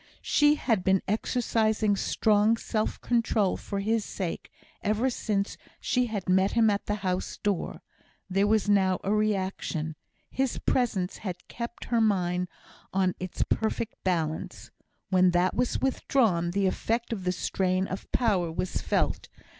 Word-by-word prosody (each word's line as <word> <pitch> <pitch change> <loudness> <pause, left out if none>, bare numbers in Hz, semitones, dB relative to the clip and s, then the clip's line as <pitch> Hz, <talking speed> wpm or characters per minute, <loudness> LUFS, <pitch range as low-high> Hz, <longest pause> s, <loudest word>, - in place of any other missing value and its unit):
She 295 0 +4
had 225 -10 0
been 190 0 +3
exercising 215 -1 +1
strong 215 +2 +2
self 215 -1 -2
control 225 -5 +1
for 200 -1 -4
his 220 +2 +1
sake 185 -4 -5 0.3
ever 225 +4 +1
since 205 -4 -2 0.2
she 250 -1 +1
had 205 -5 -4
met 190 +2 +3
him 225 -2 +4
at 200 - -2
the 210 - 0
house 185 0 -1
door; 205 -4 -2 0.4
there 195 +2 +2
was 215 -1 +2
now 190 -3 +3
a 200 - +1
reaction. 190 -6 -1 0.4
His 265 -2 0
presence 205 -8 0
had 180 -3 -6
kept 235 0 -6
her 235 -1 +1
mind 180 -4 +1 0.4
on 185 -1 +2
its 185 -1 -2
perfect 220 0 -1
balance. 165 -4 -2 0.4
When 185 -1 +5
that 180 +1 +2
was 250 0 0
withdrawn, 225 -10 +1
the 195 +2 0
effect 230 +5 -1
of 195 -4 -5
the 180 - +1
strain 185 +1 0
of 190 0 -7
power 190 -8 +1
was 180 +3 -2
felt. - - 0
200 Hz, 145 wpm, -28 LUFS, 185-225 Hz, 0.4 s, When